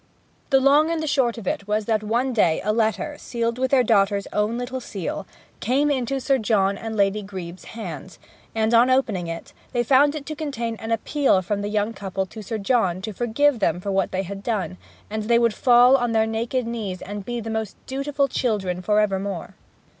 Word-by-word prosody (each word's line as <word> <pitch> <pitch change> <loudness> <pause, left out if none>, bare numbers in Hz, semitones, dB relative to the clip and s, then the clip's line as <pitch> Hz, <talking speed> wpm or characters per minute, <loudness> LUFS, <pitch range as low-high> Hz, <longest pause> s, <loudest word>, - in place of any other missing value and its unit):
The 270 -2 +5
long 285 +4 +4
and 335 -1 0
the 315 - -2
short 265 -6 +1
of 225 - -8
it 200 - -2
was 210 0 0
that 220 -1 +1
one 240 +5 0
day 175 -8 +3
a 210 - +1
letter, 225 +6 0
sealed 235 0 -2
with 260 0 +1
their 260 -2 +4
daughter's 200 -3 +2
own 210 +3 0
little 250 +1 -4
seal, 195 -4 -5 0.3
came 280 +6 +2
into 270 0 -1
Sir 270 0 +1
John 200 -3 +2
and 220 +2 -5
Lady 200 0 +2
Grebe's 185 -3 -8
hands; 185 -6 -8 0.4
and, 220 +1 +1
on 235 +2 +6
opening 220 -9 +1
it, 165 0 -7 0.2
they 240 -1 +2
found 285 +4 +4
it 295 -2 -6
to 310 - -5
contain 240 -7 -3
an 225 +1 -6
appeal 225 -3 +2
from 200 +2 -2
the 205 - -3
young 210 +1 0
couple 195 -2 -3
to 190 +4 -10
Sir 220 +2 -4
John 195 -4 +1
to 215 - -4
forgive 240 +5 +2
them 190 -3 +1
for 200 +2 -3
what 195 0 +1
they 190 +1 -1
had 195 +1 -7
done, 200 - -2 0.3
and 215 0 -4
they 235 +1 +4
would 235 -2 +3
fall 245 +2 +6
on 245 -3 0
their 220 0 +3
naked 230 +3 -1
knees 215 -6 -4
and 205 0 -6
be 240 +3 -4
most 220 -2 -4
dutiful 275 +1 -1
children 200 -9 -1
for 210 +3 +2
evermore. 195 -3 -1
225 Hz, 205 wpm, -23 LUFS, 200-250 Hz, 0.4 s, on